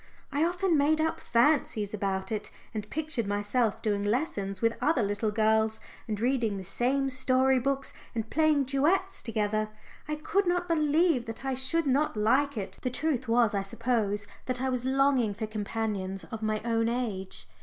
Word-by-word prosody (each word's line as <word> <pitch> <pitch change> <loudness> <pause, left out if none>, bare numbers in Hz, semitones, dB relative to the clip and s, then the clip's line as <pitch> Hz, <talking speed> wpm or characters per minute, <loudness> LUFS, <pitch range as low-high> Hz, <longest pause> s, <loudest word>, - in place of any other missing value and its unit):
I 290 +2 +1
often 350 -1 +2
made 305 +2 +3
up 320 +1 0
fancies 235 -5 +2
about 195 -1 -2
it, 210 -1 -3 0.2
and 210 -1 -5
pictured 300 -8 -2
myself 205 +3 0
doing 205 -2 0
lessons 205 -4 -1
with 230 0 +2
other 290 -3 +2
little 205 +2 0
girls 220 +1 +2 0.3
and 210 -2 -3
reading 235 -4 +1
the 190 - -6
same 260 +8 0
story 260 0 +3
books 275 +1 -1 0.2
and 225 -1 -2
playing 310 +1 +3
duets 315 +9 +1
together. 215 -1 -1 0.4
I 305 - -1
could 380 +6 0
not 355 0 +1
believe 310 -4 +2
that 225 +4 -6
I 270 - 0
should 265 +6 0
not 275 -2 +1
like 260 +6 +2
it. 195 -2 -5
The 255 - -1
truth 265 -1 -1
was, 230 -1 +3
I 200 - +1
suppose, 205 0 -1 0.2
that 255 -1 -1
I 265 +1 0
was 250 -1 -2
longing 265 -5 +2
for 220 - -3
companions 205 -3 -3
of 220 - -5
my 215 -1 -1
own 230 -1 +1
age. 195 - -3
240 Hz, 175 wpm, -29 LUFS, 215-280 Hz, 0.4 s, made